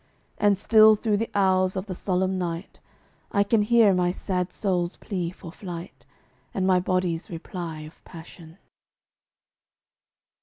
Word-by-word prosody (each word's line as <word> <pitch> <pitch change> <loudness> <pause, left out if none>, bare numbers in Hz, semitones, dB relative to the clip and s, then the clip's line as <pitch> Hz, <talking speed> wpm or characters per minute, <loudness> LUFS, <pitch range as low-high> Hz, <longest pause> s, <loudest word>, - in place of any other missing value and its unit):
And 205 -1 +3
still 215 +1 +6
through 215 -1 0
the 225 +2 -2
hours 185 -1 +2
of 190 0 -3
the 195 - -5
solemn 185 +1 -1
night 170 +1 -5 0.5
I 200 - +3
can 210 +2 +2
hear 220 -1 +4
my 180 -1 +1
sad 180 0 -2
soul's 180 -3 -1
plea 180 -5 -3
for 175 -1 -11
flight, 175 -1 -9 0.5
And 190 - 0
my 185 -1 +4
body's 180 -2 -1
reply 165 -1 -6
of 155 +1 -13
passion. 165 0 -13
185 Hz, 140 wpm, -25 LUFS, 175-200 Hz, 0.5 s, still